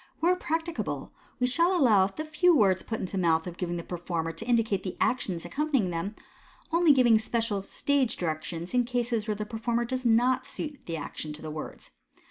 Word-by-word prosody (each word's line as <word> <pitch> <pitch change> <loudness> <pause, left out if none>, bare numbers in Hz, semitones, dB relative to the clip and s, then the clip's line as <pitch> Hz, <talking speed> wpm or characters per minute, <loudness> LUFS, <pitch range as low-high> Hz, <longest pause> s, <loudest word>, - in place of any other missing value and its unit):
Where 350 +2 +3
practicable, 330 -1 -3 0.3
we 250 - +2
shall 340 +8 +3
allow 215 - +5
the 305 +11 -6
few 340 +3 +4
words 195 -7 +4
put 220 - -4
into 190 +1 -4
the - - +1
mouth 160 -2 +2
of 175 -2 -6
the 175 -1 -3
performer 170 -2 -3
to 165 +8 -8
indicate 230 -4 +2
the 185 - -6
actions 190 -9 0
accompanying 275 -10 0
them, 175 +6 -3 0.6
only 335 -1 +5
giving 240 -5 +5
special 225 -2 -1
"stage 260 +4 0
directions" 165 +2 -4
in 250 0 +4
cases 240 -2 -1
where 215 - 0
the 210 +1 -4
performer 235 +2 -1
does 255 +2 -3
not 245 +2 +3
suit 295 -3 -5
the 165 -1 -3
action 150 0 -6
to 155 - -9
the 155 - -5
words. 155 0 -7
225 Hz, 190 wpm, -28 LUFS, 180-260 Hz, 0.6 s, allow